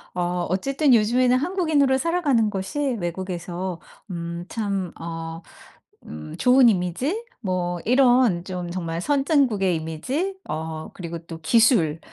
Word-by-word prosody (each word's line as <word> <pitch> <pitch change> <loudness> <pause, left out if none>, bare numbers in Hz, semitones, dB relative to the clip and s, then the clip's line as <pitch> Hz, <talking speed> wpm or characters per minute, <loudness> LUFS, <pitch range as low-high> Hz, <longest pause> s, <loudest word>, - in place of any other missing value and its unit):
어 180 - -1 0.3
어쨌든 270 - +2
요즘에는 245 +3 +3
한국인으로 300 -5 +2
살아가는 290 -10 +2
것이 195 +9 -4 0.2
외국에서 175 0 -4 0.3
음 170 0 -5
참 200 -5 -2
어 165 0 -6 0.7
음 75 0 -8
좋은 250 -1 +6
이미지, 225 - -1 0.2
뭐 180 -3 -2
이런 245 -7 +4
좀 180 -2 -5
정말 170 -2 -3
선진국의 270 - +2
이미지, 255 - -3
어 160 0 -5
그리고 170 -2 -6
또 165 -1 -8
기술, 175 - +3
190 Hz, 255 characters per minute, -23 LUFS, 170-260 Hz, 0.7 s, 좋은